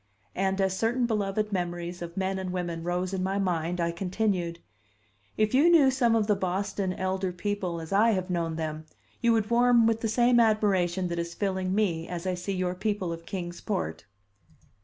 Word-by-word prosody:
And, 190 +1 0
as 190 -1 +1
certain 235 +5 +1
beloved 210 -1 -1
memories 175 -1 -3
of 170 +1 -7
men 190 0 -1
and 185 -1 -4
women 175 -2 -3
rose 180 +2 -2
in 190 - -1
my 190 +1 -1
mind, 175 -2 -1
I 170 0 +1
continued: 180 -1 -1 0.8
"If 215 +1 +1
you 290 +6 +5
knew 300 -6 +6
some 240 -3 +2
of 220 -2 +2
the 210 -1 +2
Boston 190 0 -2
elder 190 0 -2
people 180 -1 -3
as 160 +3 -6
I 215 +4 +5
have 185 -1 -2
known 165 -2 -1
them, 155 -1 -4 0.3
you 235 - +4
would 220 0 0
warm 240 -1 +5
with 225 0 +1
the 225 - 0
same 240 +2 +4
admiration 195 -5 +2
that 170 0 -2
is 170 0 -4
filling 190 -2 -1
me 170 -6 0
as 175 0 -5
I 185 - 0
see 180 +2 -3
your 180 -1 -1
people 190 -2 -2
of 165 0 -10
Kings 175 -2 -5
Port." 85 - -3
190 Hz, 195 wpm, -28 LUFS, 175-215 Hz, 0.8 s, knew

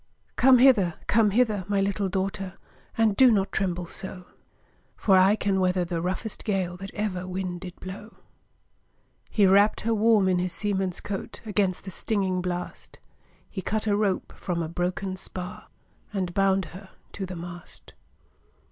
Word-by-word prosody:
'Come 255 0 +6
hither! 225 -10 +5
come 220 -1 +4
hither! 215 -2 +2
my 200 -1 +1
little 195 0 0
daughtèr. 190 0 -2 0.4
And 220 -3 +3
do 260 +2 +7
not 200 -4 +2
tremble 180 -2 -1
so; 185 +1 -7 0.7
For 195 - +4
I 190 +2 +6
can 200 -2 0
weather 180 -1 +1
the 170 -1 -3
roughest 190 +5 -3
gale 190 -4 -1
That 195 +1 -8
ever 185 -4 -2
wind 185 -1 -4
did 180 -1 -9
blow.' 200 +4 -9 1.1
He 205 - +3
wrapp'd 200 +3 +4
her 230 +1 0
warm 215 -2 +4
in 180 -1 +2
his 180 0 -1
seaman's 195 -3 -1
coat 195 -2 -5
Against 200 -4 0
the 190 - -7
stinging 190 -1 0
blast; 180 0 -5 0.5
He 190 - -6
cut 215 +4 -2
a 205 -2 +2
rope 200 -3 0
from 170 -2 -2
a - - -3
broken 180 +3 -2
spar, 185 +3 -6 0.4
And 185 -4 -2
bound 195 -1 +2
her 190 +1 -11 0.2
to 195 -2 -4
the 185 - -6
mast. 175 0 -10
190 Hz, 160 wpm, -26 LUFS, 180-205 Hz, 1.1 s, do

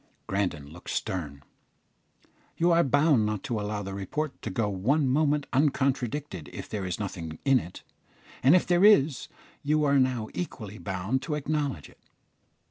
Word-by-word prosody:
Grandon 90 -8 -2
looked 90 - -11
stern. 75 -7 -3 1.1
"You 170 +1 +3
are 170 0 +5
bound 145 -3 +3
not 105 -2 -2
to 115 -3 -2
allow 105 0 -3
the 95 0 -6
report 135 +10 -4
to - - -4
go 105 +3 0
one 125 +10 +1
moment 145 +2 +2
uncontradicted 135 - 0
if - - -7
there 100 -3 -4
is 90 - -3
nothing 85 -6 -5
in 135 -2 +5
it; 90 -3 -10 0.6
and 135 +7 +6
if 180 - +3
there 175 +1 +3
is, 155 - +5 0.3
you 150 +1 +1
are 140 -1 +4
now 125 -4 +1
equally 110 - -6
bound 100 +7 -2
to 150 +2 -3
acknowledge 145 - -2
it." - - -21
130 Hz, 160 wpm, -27 LUFS, 95-150 Hz, 1.1 s, and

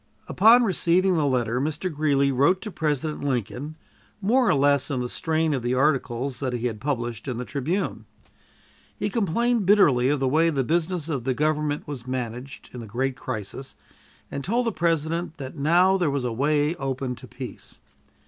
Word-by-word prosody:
Upon 230 +5 +6
receiving 185 -2 +2
this 160 - +1
letter, 125 -2 0
Mr. 155 +4 -2
Greeley 140 -2 +2
wrote 140 +8 +3
to 215 - -6
President 150 -3 -2
Lincoln, 135 +3 -3 0.4
more 235 +4 +3
or 180 - +4
less 140 -1 +2
in 135 -3 -1
the 125 - -2
strain 160 +4 0
of 135 - -1
the 120 +2 0
articles 135 -2 0
that 130 -3 -2
he 120 0 -3
had 110 -3 -3
published 120 -4 -3
in 125 -3 -3
the 125 - -4
Tribune. 155 +10 -2 0.9
He 205 0 -2
complained 230 +1 +1
bitterly 140 -12 +5
of 145 0 +1
the 135 - +1
way 160 +5 +3
the 140 -4 0
business 170 +3 -1
of 140 -7 -2
the 130 0 -1
Government 150 0 -1
was 130 -4 -7
managed 125 +1 -5
in 125 - -7
the 115 - -8
great 130 +5 -2
crisis, 120 +2 -6 0.6
and 140 - -4
told 235 - 0
the 230 - +1
President 165 -1 -1
that 135 -1 -7
now 175 +6 +4
there 175 -5 +1
was 140 -2 -1
a 120 -2 -2
way 145 +4 +1
open 135 -1 -3
to - - -11
peace. - - -9
145 Hz, 185 wpm, -25 LUFS, 130-170 Hz, 0.9 s, Upon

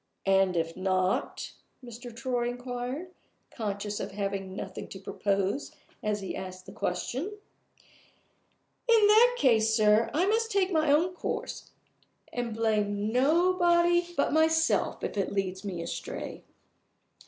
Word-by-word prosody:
"And 195 -2 +3
if 165 0 -1
not?" 185 0 -1 0.3
Mr. 240 +1 -9
Troy 240 +1 -1
inquired, 245 +7 -5 0.4
conscious 205 -2 -3
of - - -5
having 195 -1 -3
nothing - - -6
to 190 - -9
propose 200 +5 -1 0.3
as 210 -1 -1
he 190 - -5
asked 185 0 -7
the - - -10
question. 235 - -2 1.6
"In 450 -3 +6
that 465 +4 +6
case, 220 - +3
sir, 215 0 +4
I 335 +5 +2
must 450 +3 +1
take 395 -3 +1
my 310 -3 +3
own 335 +5 +3
course, - - -4 0.6
and 240 -1 -2
blame 210 -2 0
nobody 345 +5 +4
but 280 - +2
myself 320 +1 +2
if - - -3
it 195 - 0
leads 190 -1 -2
me 180 -4 -4
astray." - - -6
Mr. - - -34
230 Hz, 130 wpm, -29 LUFS, 195-320 Hz, 1.6 s, In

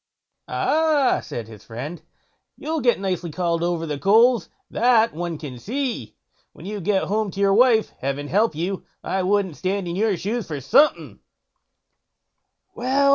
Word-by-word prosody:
"Ah!" 310 -4 +2
said 115 -2 -6
his 110 -2 -13
friend, 140 +9 -7 0.6
"you'll 320 0 -3
get 240 -4 +3
nicely 180 -3 -2
called 170 0 -1
over 170 -1 -1
the 150 -3 -4
coals, 225 - +4 0.2
that 230 -2 +3
one 170 0 -4
can 140 -5 -8
see, 230 - -4 0.4
when 165 - -13
you 205 0 -5
get 195 +2 +1
home 215 +1 -1
to 195 - -8
your 200 -1 +4
wife. 230 0 +4
Heaven 140 +2 -3
help 205 +2 +2
you, 180 +5 -3 0.2
I 190 - -1
wouldn't 190 -3 0
stand 190 0 -2
in 170 - -3
your 205 -1 +1
shoes 215 +2 -3
for 150 -3 -4
something." 275 - +2 1.5
"Well!" 275 +3 +2
195 Hz, 155 wpm, -23 LUFS, 165-230 Hz, 1.5 s, coals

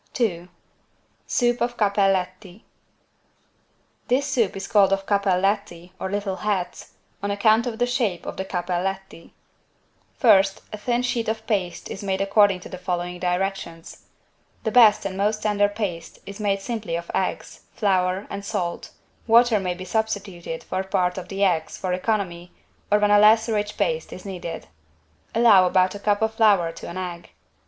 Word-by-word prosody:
2 180 -8 -1 0.8
SOUP 240 -1 +1
OF 240 0 -1
"CAPPELLETTI" 195 -1 0 1.4
This 260 +3 +2
Soup 240 -9 0
is 195 - -5
called 200 -2 +4
of 195 0 0
"=Cappelletti=" 195 -2 0
or 190 - -3
"little 200 -1 -2
hats" 195 -4 -3 0.3
on 200 - -2
account 215 +4 +3
of 230 -2 -4
the 245 - +2
shape 235 -8 -1
of - - -5
the 190 - -3
"=Cappelletti=". 190 0 -4 0.9
First 195 -6 +4
a - - -4
thin 240 +3 0
sheet 245 -2 -1
of 220 0 -3
paste 185 -6 -2
is 195 - -7
made 190 -1 -1
according 195 -1 +3
to - - -9
the 185 - -8
following 180 -1 -3
directions: 180 -2 -3 0.6
The 220 - -1
best 215 -4 +6
and 190 -1 -3
most 210 +2 0
tender 205 -1 +2
paste 195 -6 -5
is 200 +1 -9
made 200 -2 0
simply 215 -5 -4
of 170 0 -5
eggs, - - -3
flour 185 -2 +1
and 200 0 -5
salt, 175 -3 -3 0.4
water 230 -1 +5
may 180 -2 -2
be 185 +1 -8
substituted 195 -5 -3
for 190 - -3
part 185 -1 0
of 180 - -9
the 195 +1 -2
eggs, 170 -5 0
for 185 -1 -2
economy, 180 -3 -2 0.4
or 210 - +6
when 210 0 +2
a 205 - +6
less 220 +2 +5
rich 210 -2 -2
paste 485 0 -1
is 185 - -10
needed. 180 -4 -6 0.7
Allow 215 -6 +6
about 185 0 +2
a 205 - -7
cup 205 +1 +1
of 220 0 0
flour 205 -7 +3
to - - -9
an 170 - -7
egg. 175 -2 -6
195 Hz, 165 wpm, -23 LUFS, 180-215 Hz, 1.4 s, best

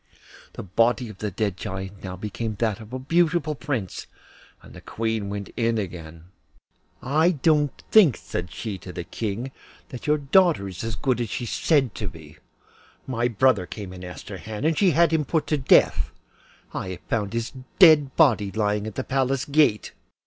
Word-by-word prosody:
The - - -7
body 115 +5 +1
of 105 - -12
the 105 - -2
dead 100 -1 -2
Giant 95 +1 -6
now 95 -1 -5
became 105 +3 -4
that 110 0 -1
of 110 0 -12
a 130 - -3
beautiful 160 +3 +1
prince, 130 - -4 0.6
and - - -14
the - - -11
Queen 110 -2 -3
went 100 0 -5
in 115 -1 +1
again. 85 -5 -6 0.8
'I 155 +6 +3
don't 150 -4 +2
think,' 185 - +6
said 90 -1 -5
she 100 +4 -5
to 90 - -9
the 85 - -5
King, 115 +7 -4 0.4
'that 125 - -8
your 150 0 +3
daughter 150 - +3
is 90 +1 -7
as 115 -1 -3
good 125 +1 0
as 115 - -3
she 125 - -3
is 120 - -4
said 140 -8 +2
to 105 - -5
be. 80 -3 -11 0.7
My 120 -2 0
brother 115 -5 +2
came 100 -4 -7
and 90 0 -10
asked 90 -4 -9
her - - -6
hand, 110 +5 -5
and 160 0 +2
she 195 +4 +4
has 165 - 0
had 170 0 +4
him 160 -1 +2
put 160 +2 0
to 150 - 0
death. 130 - +4 0.6
I - - -4
have 95 -1 -6
just - - -36
found 105 -2 -1
his 115 0 -2 0.3
dead 155 -7 +6
body 110 -11 +4
lying 105 0 -1
at 110 - -7
the 130 - -2
Palace 135 0 0
gate. 145 -7 +2
115 Hz, 195 wpm, -24 LUFS, 100-140 Hz, 0.8 s, think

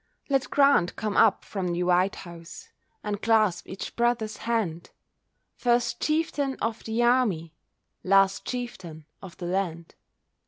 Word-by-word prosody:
Let 270 -1 +1
Grant 280 -11 +3
come 215 -2 -3
up 220 -3 +4
from 190 -3 -3
the 175 0 -1
White 180 +2 +2
House, 170 -2 -11 0.3
And 205 0 -3
clasp 215 -5 +2
each 190 - -7
brother's 235 -3 0
hand, 215 -8 -2 0.6
First 240 -1 0
chieftain 300 -3 0
of 225 +1 -3
the 225 +2 0
army, 215 -10 +2 0.5
Last 195 0 +3
chieftain 190 - -6 0.2
of 190 -3 -11
the 175 - -6
land. 175 -2 -3
205 Hz, 130 wpm, -26 LUFS, 175-240 Hz, 0.6 s, up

